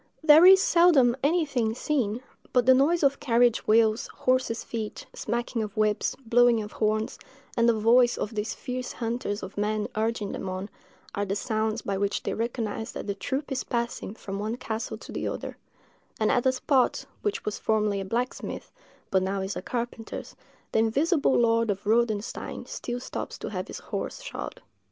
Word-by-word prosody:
There 315 +3 +8
is 380 0 +8
seldom 315 -9 +5
anything 280 -8 +1
seen; 250 -4 -1 0.3
but 250 -2 +4
the 260 - +8
noise 295 +6 +3
of 280 0 +3
carriage 240 -4 +2
wheels, 220 +1 +3
horses' 255 -3 0
feet, 220 -2 -5
smacking 235 0 -2
of 210 -1 -5
whips, 215 -1 +1
blowing 240 0 +5
of 210 - -8
horns, 215 0 -1 0.4
and 235 0 +4
the 225 -2 +2
voice 240 +2 +5
of 210 - -3
these 210 0 -3
fierce 250 0 -5
hunters 230 -3 -3
of 190 +2 -6
men 210 0 0
urging 220 -1 -1
them 190 - -4
on, 185 +2 -5 0.4
are 200 - -1
the 195 0 -2
sounds 220 +1 -1
by 195 -1 -2
which 200 0 -1
they - - -2
recognise 225 0 -3
that - - -6
the 200 - -1
troop 265 +8 -4
is 260 - -1
passing 235 -3 -3
from 195 -3 -6
one 215 +3 -2
castle 225 -2 -4
to - - -11
the - - -3
other; - - -5 0.6
and 215 - +2
at 245 +1 +2
a - - +5
spot 260 0 +1 0.2
which 420 +2 -2
was 210 - -3
formerly 210 -2 +1
a - - -3
blacksmith's, 240 +6 -3 0.4
but 190 - +3
is - - -1
now 195 0 -1
a - - -4
carpenter's, 235 +1 -5 0.4
the - - +2
invisible 280 +7 +2
lord 230 -1 +3
of 200 0 -2
Rodenstein 220 -1 0
still 245 0 -5
stops - - -6
to - - -5
have - - -4
his - - -7
horse - - -5
shod. - - -6
230 Hz, 180 wpm, -27 LUFS, 215-255 Hz, 0.6 s, There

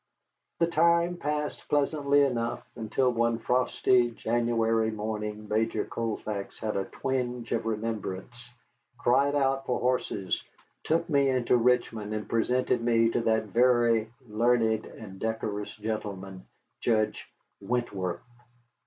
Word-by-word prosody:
The 170 - +3
time 170 +1 +3
passed 150 -1 -3
pleasantly 145 -1 +3
enough 120 -4 -1
until 120 +3 +1
one 115 -1 +1
frosty 125 0 +2
January 115 -1 +1
morning 105 0 -4
Major 110 +2 0
Colfax 105 -3 -4
had 110 -1 -3
a 95 - -1
twinge 125 -3 -3
of 115 -1 -1
remembrance, 110 -1 -3 0.6
cried 140 +4 +3
out 135 -1 +1
for 125 - 0
horses, 125 -6 -1 0.4
took 165 +1 +1
me 140 -1 +3
into 125 -1 +2
Richmond, 115 -3 +1
and 105 - -4
presented 125 +1 +1
me 115 -1 +3
to 120 - 0
that 110 -1 +2
very 120 -1 +3 0.2
learned 110 0 +2
and 95 -3 -11
decorous 105 -2 -3
gentleman, 100 -3 -5 0.3
Judge 110 -2 0 0.3
Wentworth. 100 -5 -2
115 Hz, 120 wpm, -28 LUFS, 110-125 Hz, 0.6 s, The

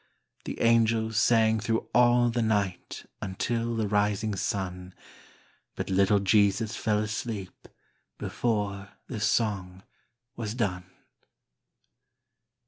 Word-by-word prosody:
The - - -5
angels 115 -1 +3
sang 110 -1 +3
thro' 115 +2 -1
all 120 0 +4
the 120 0 0
night 100 -4 -1 0.2
Until 115 +4 -2
the 110 -2 0
rising 105 +1 0
sun, 95 -2 -4 0.8
But - - -4
little 100 +2 +4
Jesus 105 +2 +2
fell 105 -2 0
asleep 110 -2 -4 0.5
Before 105 -3 -2
the 120 - -6
song 100 -3 -1 0.5
was 110 -1 -4
done. 90 -7 -2
105 Hz, 100 wpm, -27 LUFS, 100-115 Hz, 0.8 s, all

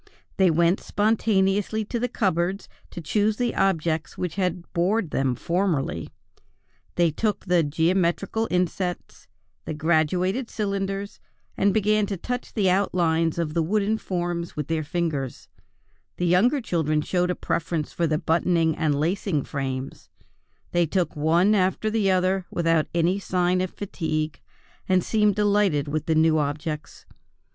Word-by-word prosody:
They 190 -2 +5
went 170 +3 +3
spontaneously 210 0 +1
to 235 +3 -3
the 245 - 0
cupboards 190 -3 -1 0.2
to 175 - -7
choose 210 +6 +1
the 245 -1 0
objects 165 -4 0
which 180 -3 -3
had 180 -2 -3
bored 185 0 +1
them 135 -2 0
formerly. 170 - -1 0.9
They 170 -2 +3
took 210 +7 -2
the 180 -2 +3
geometrical 175 +7 0
insets, 180 0 -2 0.4
the 155 - -4
graduated 175 - +1
cylinders, 200 -1 -3 0.4
and 200 - +2
began 215 0 +2
to 200 -1 -3
touch 245 +7 -4
the 205 -4 +2
outlines 170 -4 +1
of 165 -3 -2
the 165 - +1
wooden 210 +5 0
forms 175 -2 -3
with 150 0 -4
their 160 -1 0
fingers; 150 -5 -3 0.7
the 175 - -1
younger 215 - +3
children 155 -7 0
showed 180 +1 0
a 180 - 0
preference 165 -2 -2
for 170 - 0
the 155 -1 +1
buttoning 165 0 +1
and 150 -3 0
lacing 165 -2 0
frames; 135 -2 -5 0.6
they 175 -1 +2
took 175 -1 -1
one 165 +7 +3
after 195 +2 +1
the 215 -3 +1
other 185 0 +1
without 165 -2 +1
any 175 +3 +2
signs 180 -1 +1
of 185 - -1
fatigue, 155 -6 -3 0.5
and 185 -1 +3
seemed 210 -2 +2
delighted 205 -8 +2
with 150 +1 -3
the 160 - +2
new 160 0 +4
objects. 150 +1 -4
175 Hz, 145 wpm, -24 LUFS, 160-200 Hz, 0.9 s, They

